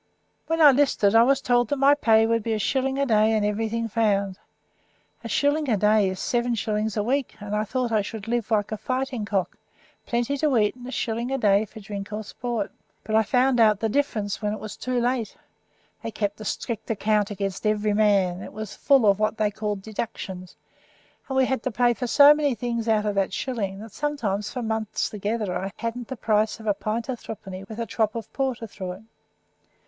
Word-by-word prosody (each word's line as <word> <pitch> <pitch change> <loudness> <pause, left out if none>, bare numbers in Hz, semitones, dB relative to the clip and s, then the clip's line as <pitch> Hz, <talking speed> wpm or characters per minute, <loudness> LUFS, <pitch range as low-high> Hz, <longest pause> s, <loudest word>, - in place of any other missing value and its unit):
When 325 0 0
I 295 -2 +9
'listed 255 -7 +3
I 225 - +7
was 270 +3 +3
told 245 -2 +2
my 275 +1 +6
pay 225 -6 +4
would 230 0 +1
be 225 +1 -2
a - - 0
shilling 265 +5 0
a 280 - +2
day 220 -2 +3
and 215 -1 +1
everything 225 +2 -1
found. 200 -3 0 0.8
A 230 - -6
shilling 290 +4 +1
a 220 - +3
day 210 -1 +3
is 185 0 -5
seven 240 +3 0
shillings 215 -1 -2
a 210 - +1
week, 265 +3 -1
and 205 0 -4
I 210 +1 0
thought 250 +2 -2
I 215 -2 +3
should 215 +1 -7
live 235 -1 -1
like 210 -2 +1
a 215 - -2
fighting 255 -2 -2
cock, 195 -4 -2 0.5
plenty 240 +4 0
to 290 -4 +2
eat 210 -2 +2
and 245 0 -11
a - - -6
shilling 235 0 -2
a 270 - 0
day 205 -3 +3
for 220 +1 -12
drink 200 0 -7
or 210 +1 -4
sport. 235 -1 -4 0.3
But 215 - -5
I 220 - +5
found 250 +3 +2
out 215 -3 +5
the 225 - 0
difference 215 -6 -1
when 210 -1 -1
it 215 - -5
was 215 -1 -7
too 255 -1 -2
late. 240 -3 -1 0.6
They - - -4
kept 210 -1 -3
a - - -7
strict 225 +1 -4
account 210 -1 +1
against 200 0 -3
every 210 0 +1
man; 200 -4 +2
it - - -9
was 215 -1 -6
full 275 -5 +3
of 200 -1 +4
what 215 +1 0
they 210 -1 +1
called 210 -2 -4
deductions, 195 -4 -6 0.7
and 265 - -1
we 265 - +5
had 265 -2 -1
to 260 - -2
pay 240 +1 +2
for 250 +1 -4
so 285 +4 +8
many 295 -4 0
things 235 -1 -3
out 215 -1 +2
of 210 - 0
that 195 -1 0
shilling 205 -7 -3
that 220 0 -10
sometimes 215 -9 -2
for 250 - -4
months 220 -1 -2
together 210 -1 -2
I 195 +1 -3
hadn't 230 0 -4
the 265 - -6
price 215 0 +1
of 220 - -11
a 210 - +3
pint 220 +4 -3
o' 260 - -2
threepenny 195 -4 -8
with 220 - -7
a 230 - -1
trop 215 0 -1
o' 230 - -3
porter 255 0 -3
through 190 -4 -6
it." 185 - -12
220 Hz, 220 wpm, -25 LUFS, 210-245 Hz, 0.8 s, I